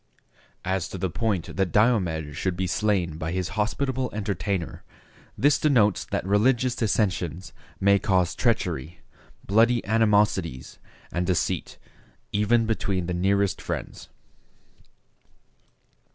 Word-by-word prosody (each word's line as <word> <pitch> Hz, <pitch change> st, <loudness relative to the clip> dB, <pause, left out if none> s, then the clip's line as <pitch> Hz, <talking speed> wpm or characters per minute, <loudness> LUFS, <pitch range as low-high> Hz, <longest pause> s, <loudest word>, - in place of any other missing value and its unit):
As 95 Hz, -1 st, -1 dB
to -, -, -6 dB
the 95 Hz, -1 st, -2 dB
point 105 Hz, -3 st, -2 dB
that 95 Hz, -2 st, +1 dB
Diomed 90 Hz, -, +1 dB
should 90 Hz, +3 st, -2 dB
be 95 Hz, -, 0 dB
slain 90 Hz, -4 st, 0 dB
by 80 Hz, +1 st, -3 dB
his 90 Hz, -1 st, -2 dB
hospitable 130 Hz, +4 st, -1 dB
entertainer, 100 Hz, -3 st, -3 dB, 0.5 s
this 145 Hz, +1 st, +3 dB
denotes 115 Hz, -, +3 dB
that -, -, -3 dB
religious 120 Hz, +5 st, +2 dB
dissensions 95 Hz, -6 st, -1 dB, 0.3 s
may 100 Hz, 0 st, +4 dB
cause 90 Hz, -3 st, +1 dB
treachery, 90 Hz, -, -1 dB, 0.4 s
bloody 115 Hz, +3 st, +3 dB
animosities, 105 Hz, -, +1 dB, 0.3 s
and 90 Hz, 0 st, -1 dB
deceit, 90 Hz, -2 st, -1 dB, 0.5 s
even 110 Hz, +3 st, +2 dB
between 100 Hz, -5 st, -1 dB
the 90 Hz, -, -2 dB
nearest 100 Hz, +2 st, +1 dB
friends. -, -, -6 dB
100 Hz, 110 wpm, -25 LUFS, 90-110 Hz, 0.5 s, may